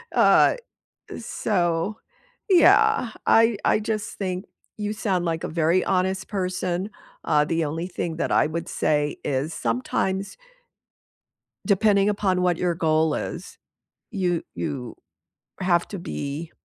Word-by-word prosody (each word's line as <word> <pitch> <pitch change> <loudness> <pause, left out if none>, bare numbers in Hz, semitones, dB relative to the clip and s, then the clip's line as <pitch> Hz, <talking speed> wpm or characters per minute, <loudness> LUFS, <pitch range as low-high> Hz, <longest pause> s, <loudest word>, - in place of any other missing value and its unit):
Uh, - - +5 0.6
so 175 +4 -1 0.5
yeah, 390 - +5 0.2
I 225 -1 +5
I - - +3
just 215 0 -3
think 185 -1 -3 0.3
you 210 0 -2
sound 190 -5 -1
like 165 -1 -2
a - - -1
very 165 +3 +2
honest 190 0 0
person, 185 -1 -2 0.4
uh, 150 -2 +3
the 165 0 0
only 165 +4 -3
thing 170 -2 -4
that - - -1
I - - +4
would 170 +3 -5
say 150 -1 0
is 140 +4 -1
sometimes 190 +11 -2 1.3
depending 200 -1 +3
upon 190 -3 +1
what 175 -2 +2
your 175 -1 0
goal 160 -2 +2
is, 175 +2 -6 0.5
you 180 -6 -1
you 135 -7 -5 0.6
have 175 -2 +2
to 200 - -6
be 155 -2 -5
180 Hz, 125 wpm, -24 LUFS, 165-200 Hz, 1.3 s, Uh